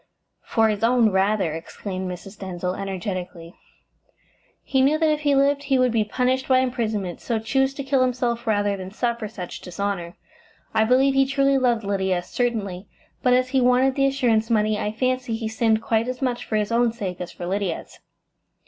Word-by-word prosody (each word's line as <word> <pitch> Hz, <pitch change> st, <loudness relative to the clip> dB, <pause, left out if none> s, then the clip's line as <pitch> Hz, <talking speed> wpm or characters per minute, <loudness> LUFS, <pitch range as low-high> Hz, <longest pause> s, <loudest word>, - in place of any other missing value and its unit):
"For 225 Hz, -1 st, +2 dB
his 210 Hz, 0 st, -2 dB
own, 235 Hz, -2 st, +4 dB
rather," 190 Hz, -3 st, +1 dB
exclaimed 185 Hz, +3 st, -5 dB
Mrs. 190 Hz, +3 st, -9 dB
Denzil 180 Hz, -1 st, -3 dB
energetically. 185 Hz, -3 st, -5 dB, 1.1 s
"He 265 Hz, -, +1 dB
knew 285 Hz, +4 st, +4 dB
that 315 Hz, -1 st, +2 dB
if 300 Hz, -, 0 dB
he 290 Hz, -2 st, +2 dB
lived 280 Hz, +1 st, +2 dB
he 275 Hz, -1 st, +2 dB
would 255 Hz, -1 st, +3 dB
be 225 Hz, -2 st, +2 dB
punished 255 Hz, +5 st, 0 dB
by 260 Hz, -, +4 dB
imprisonment, 220 Hz, -8 st, -1 dB
so 230 Hz, -, -1 dB
chose 265 Hz, +4 st, +1 dB
to 275 Hz, -, -4 dB
kill 270 Hz, -1 st, +1 dB
himself 245 Hz, -2 st, 0 dB
rather 205 Hz, -2 st, +1 dB
than 185 Hz, -1 st, -7 dB
suffer 235 Hz, +1 st, -2 dB
such 185 Hz, -4 st, -8 dB
dishonour. 180 Hz, -1 st, -4 dB, 0.6 s
I 220 Hz, -, +3 dB
believe 265 Hz, +3 st, +4 dB
he 270 Hz, 0 st, +3 dB
truly 275 Hz, 0 st, +2 dB
loved 240 Hz, -3 st, +1 dB
Lydia, 190 Hz, -3 st, 0 dB
certainly, 205 Hz, -5 st, -2 dB, 0.3 s
but 250 Hz, -, +3 dB
as 255 Hz, 0 st, +1 dB
he 265 Hz, -1 st, +2 dB
wanted 250 Hz, +2 st, +4 dB
the 275 Hz, 0 st, +2 dB
assurance 240 Hz, -5 st, +1 dB
money, 215 Hz, -1 st, +2 dB
I 210 Hz, -, -1 dB
fancy 255 Hz, +1 st, -1 dB
he 225 Hz, 0 st, -3 dB
sinned 220 Hz, 0 st, +1 dB
quite 225 Hz, +1 st, +1 dB
as 255 Hz, 0 st, -4 dB
much 245 Hz, -2 st, -2 dB
for 220 Hz, -, -3 dB
his 210 Hz, +1 st, 0 dB
own 235 Hz, 0 st, +3 dB
sake 190 Hz, -7 st, -5 dB
as 180 Hz, -, -5 dB
for 175 Hz, -, -7 dB
Lydia's." 190 Hz, -1 st, -3 dB
225 Hz, 185 wpm, -23 LUFS, 200-255 Hz, 1.1 s, own